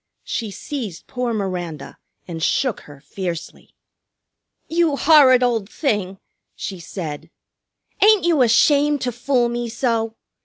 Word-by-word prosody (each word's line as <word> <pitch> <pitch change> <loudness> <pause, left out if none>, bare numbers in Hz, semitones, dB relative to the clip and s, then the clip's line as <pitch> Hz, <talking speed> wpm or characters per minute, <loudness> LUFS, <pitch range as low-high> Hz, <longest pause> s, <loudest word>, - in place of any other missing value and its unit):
She 225 - -3
seized 210 - -6
poor 250 -2 -3
Miranda 180 -8 -4 0.3
and 165 -2 -6
shook 245 - 0
her 145 -1 -13
fiercely. 170 +2 -7 0.9
"You 330 -3 +1
horrid 275 -5 +6
old 225 -5 0
thing!" 205 - -2 0.4
she 190 -3 -6
said. 165 -2 -7 0.7
"Ain't 420 -2 +6
you 335 -5 +3
ashamed 285 +4 +4
to 250 - -1
fool 245 +1 +1
me 240 0 -3
so? 225 -2 -1
235 Hz, 120 wpm, -21 LUFS, 185-270 Hz, 0.9 s, horrid